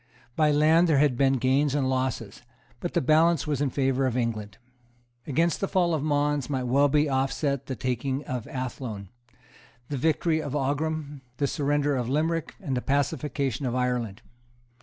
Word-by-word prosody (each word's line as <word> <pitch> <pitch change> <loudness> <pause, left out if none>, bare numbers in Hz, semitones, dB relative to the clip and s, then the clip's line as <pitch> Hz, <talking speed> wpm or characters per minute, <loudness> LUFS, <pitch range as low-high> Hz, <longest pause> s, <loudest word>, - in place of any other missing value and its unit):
By 155 -1 +3
land 155 +4 +4
there 150 - +4
had 140 -2 +3
been 135 +1 +3
gains 135 +2 +2
and 140 -3 +1
losses; 130 -1 -2 0.4
but - - -5
the - - +3
balance 160 +4 +3
was 145 -2 -1
in 145 - +1
favour 135 0 +1
of 125 -1 -1
England. 110 -4 -3 0.7
Against 165 +4 +1
the 195 - +1
fall 175 -3 +1
of 155 - 0
Mons 145 -2 0
might 130 -3 -1
well 140 +4 +3
be 150 +1 +3 0.2
set 140 -2 -1
off 135 - -33
the 130 - -4
taking 130 +3 -2
of 125 0 -4
Athlone, 125 - -5 0.8
the 145 - -2
victory 160 +3 +1
of 145 -2 -4
Aghrim, 145 +1 -2 0.2
the 140 - +1
surrender 145 0 0
of 125 -2 -2
Limerick 160 +3 -1
and 145 -10 -3
the 125 - -1
pacification 140 -2 -1
of 120 - -2
Ireland. 125 -5 -1
140 Hz, 175 wpm, -26 LUFS, 130-150 Hz, 0.8 s, land